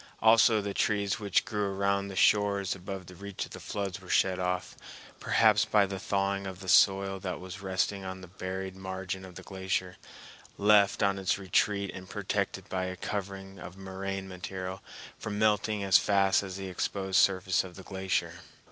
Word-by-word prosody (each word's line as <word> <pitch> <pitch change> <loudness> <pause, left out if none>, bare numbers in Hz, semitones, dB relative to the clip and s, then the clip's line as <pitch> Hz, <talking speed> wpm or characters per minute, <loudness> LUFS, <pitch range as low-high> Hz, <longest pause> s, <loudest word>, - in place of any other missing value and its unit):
Also 110 0 +5
the 100 0 -4
trees 100 -2 0
which 100 -3 +1
grew 105 -2 -1
around 100 0 +1
the 95 - -7
shores 100 -1 +3
above 95 -1 -8
reach 100 -1 -4
of - - -10
floods 95 -2 -4
were 90 - -14
shed 95 -1 +2
off, 90 0 -2 0.4
perhaps 105 -2 +4
by 105 -2 +3
the 95 0 -5
thawing 100 0 -1
of 95 -1 -7
the 95 - -9
soil 95 +3 +4
that 95 -1 -4
was 95 +1 -8
resting 95 +1 -1
on 95 0 -6
the 90 - -11
buried 95 +1 -5
margin 95 0 -5
of 95 -1 -11
the - - -9
glacier, 95 -1 -3 0.6
left 100 -1 +4
on 100 0 +2
its 95 0 +1
retreat 100 +1 +1
and 95 -1 -9
protected 100 -1 -2
by 95 -1 -2
a 95 0 -4
covering 95 0 -5
of 90 - -9
moraine 95 0 -5
material 95 0 -6 0.4
from 105 -1 -4
melting 105 -1 +2
as 95 -1 +6
fast 100 -1 +3
as 95 -2 -6
the 95 0 -5
exposed 95 0 0
surface 95 -1 +3
of 90 -2 -10
the 95 - -10
glacier. 95 -1 -2
95 Hz, 175 wpm, -29 LUFS, 95-100 Hz, 0.6 s, as